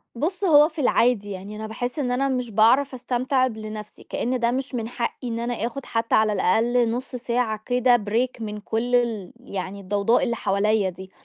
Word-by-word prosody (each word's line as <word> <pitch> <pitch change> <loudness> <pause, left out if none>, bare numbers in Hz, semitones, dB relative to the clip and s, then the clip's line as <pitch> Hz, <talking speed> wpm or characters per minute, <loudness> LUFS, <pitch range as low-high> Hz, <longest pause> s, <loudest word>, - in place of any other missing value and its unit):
بُص، 355 +11 -2
هو 300 -3 +6
في 310 -1 -5
العادي 235 -5 +2
يعني، 195 +2 -7
أنا 220 0 -5
باحس 245 +6 -4
إن 250 -3 0
أنا 270 +2 +1
مش 250 -3 -2
باعرف 240 +7 +4
أستمتع 255 +1 0
ب 220 - -7
لنفْسِي، 215 -1 -8
كأن 250 +1 -2
ده 235 0 +2
مش 260 +1 -3
من 225 -2 -2
حقي 240 +1 -4
إن 230 0 -3
أنا 240 +1 -2
آخد 245 +3 -5
حتى 230 0 0
على 215 -1 +3
الأقل 230 +5 +2
نُص 255 +2 -4
ساعة 235 -3 -1
كده 245 0 +4
Break 240 +2 0
من 210 -1 -4
كل 230 +4 -1
ال 230 -6 0
يعني 200 -3 -5
الضوضاء 200 +4 +2
اللي 235 -2 0
حواليّا 200 -1 +1
دي، 190 +1 -11
235 Hz, 195 wpm, -24 LUFS, 215-250 Hz, -, هو